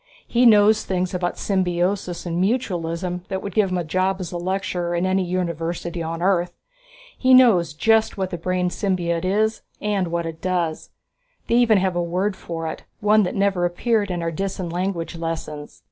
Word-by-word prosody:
"He 245 Hz, +1 st, +4 dB
knows 215 Hz, 0 st, +5 dB
things 185 Hz, -1 st, -2 dB
about 175 Hz, -1 st, -2 dB
symbiosis 180 Hz, -1 st, -1 dB
and 170 Hz, 0 st, -1 dB
mutualism 180 Hz, -5 st, -1 dB
that 190 Hz, 0 st, -4 dB
would 200 Hz, -, -5 dB
get 205 Hz, -2 st, +2 dB
him 185 Hz, -, -1 dB
a 175 Hz, -, -1 dB
job 185 Hz, +4 st, 0 dB
as 180 Hz, -3 st, -5 dB
a 175 Hz, -, -3 dB
lecturer 180 Hz, -1 st, -2 dB
in 175 Hz, +2 st, 0 dB
any 185 Hz, 0 st, +1 dB
university 170 Hz, -1 st, -3 dB
on 165 Hz, +1 st, -4 dB
Earth. 180 Hz, -2 st, +1 dB, 0.6 s
He 255 Hz, 0 st, +5 dB
knows 185 Hz, -, +5 dB
just 225 Hz, +5 st, +2 dB
what 190 Hz, -1 st, -2 dB
the 175 Hz, -, -3 dB
brain 180 Hz, +1 st, 0 dB
symbiote 175 Hz, -4 st, -1 dB
is 215 Hz, +4 st, +1 dB, 0.2 s
and 205 Hz, -3 st, 0 dB
what 170 Hz, 0 st, -2 dB
it 165 Hz, -1 st, -6 dB
does. 175 Hz, -4 st, -2 dB, 0.6 s
They 235 Hz, -, +1 dB
even 230 Hz, -3 st, +5 dB
have 185 Hz, -1 st, 0 dB
a 175 Hz, -, +1 dB
word 185 Hz, +4 st, -1 dB
for 165 Hz, -3 st, -6 dB
it, 160 Hz, -, -5 dB, 0.2 s
one 210 Hz, +1 st, +4 dB
that 180 Hz, -, -1 dB
never 195 Hz, -3 st, +1 dB
appeared 205 Hz, +4 st, +1 dB
in 175 Hz, -2 st, -2 dB
our 165 Hz, -, -1 dB
Disan 185 Hz, 0 st, -3 dB
language 180 Hz, -2 st, -2 dB
lessons. 160 Hz, -3 st, -5 dB
185 Hz, 185 wpm, -22 LUFS, 170-195 Hz, 0.6 s, knows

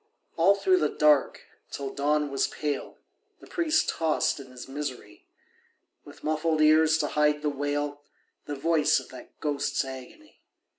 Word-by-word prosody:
All 190 Hz, +4 st, +5 dB
through 370 Hz, -, +3 dB
the -, -, +1 dB
dark, 150 Hz, -3 st, +2 dB, 0.3 s
till 140 Hz, -1 st, -5 dB
dawn 150 Hz, 0 st, 0 dB
was 135 Hz, -, +1 dB
pale, 145 Hz, -2 st, -4 dB, 0.4 s
The -, -, -14 dB
priest 320 Hz, -2 st, +1 dB
tossed 160 Hz, -2 st, 0 dB
in 135 Hz, -, -10 dB
his 125 Hz, -1 st, -10 dB
misery, 130 Hz, -7 st, -7 dB, 0.8 s
With -, -, -15 dB
muffled 155 Hz, +1 st, 0 dB
ears 155 Hz, +1 st, +5 dB
to 150 Hz, -2 st, -1 dB
hide 150 Hz, 0 st, +1 dB
the 150 Hz, -, +1 dB
wail, 145 Hz, +1 st, -3 dB, 0.4 s
The 145 Hz, -, -4 dB
voice 155 Hz, +2 st, +2 dB
of -, -, -12 dB
that -, -, -13 dB
ghost's 145 Hz, -2 st, -1 dB
agony. 135 Hz, -, -11 dB
150 Hz, 150 wpm, -27 LUFS, 140-155 Hz, 0.8 s, All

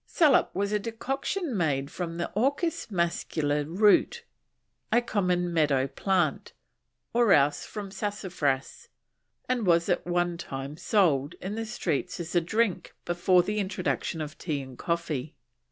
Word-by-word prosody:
Saloup 300 Hz, -6 st, +4 dB
was 200 Hz, +2 st, 0 dB
a 210 Hz, -, +1 dB
decoction 270 Hz, -, -3 dB
made 145 Hz, -6 st, 0 dB
from 170 Hz, -2 st, -4 dB
the 170 Hz, -, -3 dB
Orchis 280 Hz, -, 0 dB
mascula 165 Hz, -5 st, 0 dB
root, 210 Hz, -, +3 dB, 0.7 s
a 240 Hz, -, +5 dB
common 180 Hz, -6 st, 0 dB
meadow 145 Hz, -5 st, +3 dB
plant, 185 Hz, +8 st, 0 dB, 0.6 s
or 235 Hz, -4 st, +5 dB
else 145 Hz, +1 st, +3 dB
from 205 Hz, -2 st, -6 dB
Sassafras, 190 Hz, -9 st, -2 dB, 0.6 s
and 245 Hz, -5 st, 0 dB
was 170 Hz, -1 st, +3 dB
at -, -, 0 dB
one 175 Hz, -1 st, 0 dB
time 135 Hz, -2 st, -6 dB
sold 155 Hz, -6 st, +2 dB
in 190 Hz, +2 st, -6 dB
the 225 Hz, +1 st, -4 dB
streets 180 Hz, -, -2 dB
as 170 Hz, -1 st, -5 dB
a 175 Hz, -, +4 dB
drink 215 Hz, +2 st, -1 dB
before 175 Hz, +1 st, +3 dB
the 210 Hz, +2 st, -2 dB
introduction 185 Hz, -4 st, -2 dB
of 155 Hz, +1 st, -7 dB
tea 150 Hz, -5 st, -2 dB
and 130 Hz, -1 st, -11 dB
coffee. 165 Hz, -3 st, -2 dB
175 Hz, 140 wpm, -28 LUFS, 155-210 Hz, 0.7 s, a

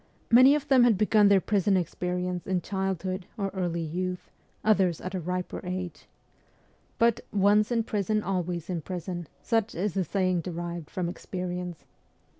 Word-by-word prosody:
Many 255 Hz, +4 st, +8 dB
of 295 Hz, -1 st, -3 dB
them 265 Hz, -3 st, +6 dB
had 235 Hz, -4 st, +4 dB
begun 210 Hz, 0 st, +4 dB
their 200 Hz, -1 st, +6 dB
prison 195 Hz, 0 st, +2 dB
experience 180 Hz, 0 st, -2 dB
in 185 Hz, -2 st, 0 dB
childhood 190 Hz, -1 st, -3 dB
or 200 Hz, -2 st, -1 dB
early 175 Hz, -3 st, -2 dB
youth, 180 Hz, +3 st, -4 dB, 0.3 s
others 190 Hz, -6 st, +3 dB
at 185 Hz, -, -6 dB
a 185 Hz, -, -1 dB
riper 180 Hz, +2 st, -3 dB
age. 180 Hz, -4 st, -5 dB, 0.9 s
But 235 Hz, -1 st, +3 dB
'once 210 Hz, +2 st, +3 dB
in 230 Hz, -1 st, +2 dB
prison, 215 Hz, -1 st, -1 dB
always 180 Hz, -3 st, -2 dB
in 175 Hz, -3 st, -3 dB
prison/ 175 Hz, -1 st, -5 dB, 0.2 s
such 225 Hz, -2 st, 0 dB
is 190 Hz, +2 st, -1 dB
the 190 Hz, -, +1 dB
saying 185 Hz, 0 st, 0 dB
derived 170 Hz, -1 st, -5 dB
from 180 Hz, -2 st, -2 dB
experience. 180 Hz, -1 st, -5 dB
185 Hz, 155 wpm, -28 LUFS, 180-205 Hz, 0.9 s, Many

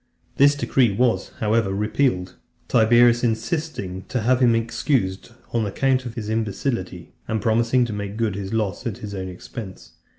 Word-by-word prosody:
This 145 Hz, +1 st, +6 dB
decree 130 Hz, -5 st, +2 dB
was, 120 Hz, +3 st, +1 dB
however, 110 Hz, -2 st, +2 dB
repealed; 100 Hz, -2 st, 0 dB, 0.3 s
Tiberius 120 Hz, +2 st, +5 dB
insisting 115 Hz, -, -2 dB
to 125 Hz, -, -1 dB
have 125 Hz, +3 st, +2 dB
him 120 Hz, -3 st, +4 dB
excused 115 Hz, -3 st, -1 dB, 0.2 s
on 115 Hz, -1 st, +1 dB
account 130 Hz, +4 st, 0 dB
of 115 Hz, -, -8 dB
his 110 Hz, -3 st, -5 dB
imbecility, 105 Hz, -4 st, -3 dB
and 110 Hz, -, -1 dB
promising 115 Hz, +3 st, +2 dB
to 115 Hz, -, -5 dB
make 100 Hz, 0 st, -5 dB
good 115 Hz, -3 st, 0 dB
his 95 Hz, 0 st, -5 dB
loss 110 Hz, +2 st, -2 dB
at 105 Hz, -, -4 dB
his 105 Hz, -1 st, -7 dB
own 95 Hz, -1 st, -4 dB
expense. 105 Hz, 0 st, -9 dB
115 Hz, 160 wpm, -23 LUFS, 100-120 Hz, 0.3 s, This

